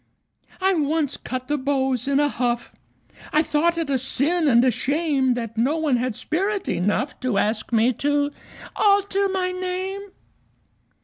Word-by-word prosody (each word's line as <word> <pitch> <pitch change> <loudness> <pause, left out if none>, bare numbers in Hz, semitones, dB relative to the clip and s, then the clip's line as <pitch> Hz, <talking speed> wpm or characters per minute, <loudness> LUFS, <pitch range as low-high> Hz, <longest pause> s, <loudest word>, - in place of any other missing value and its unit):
I 385 +1 +2
once 305 -3 0
cut 255 0 -6
the 295 0 -1
beaux 265 -1 0
in 280 0 +2
a 290 - +3
huff 240 -3 -2 0.6
I 305 - +3
thought 335 +3 +1
it 330 -2 -1
a 265 - +2
sin 305 +6 +1
and 240 -2 +5
a 255 - +4
shame 280 -2 0
That 230 -2 -5
no 275 +7 +2
one 300 -6 +1
had 250 -2 -2
spirit 390 - -2
enough 210 - -1
To 255 -5 -1
ask 215 +3 -1
me 230 +2 +3
to 290 +3 0 0.4
alter 400 -1 +2
my 370 -1 -1
name. 370 +2 -3
285 Hz, 160 wpm, -23 LUFS, 255-340 Hz, 0.6 s, and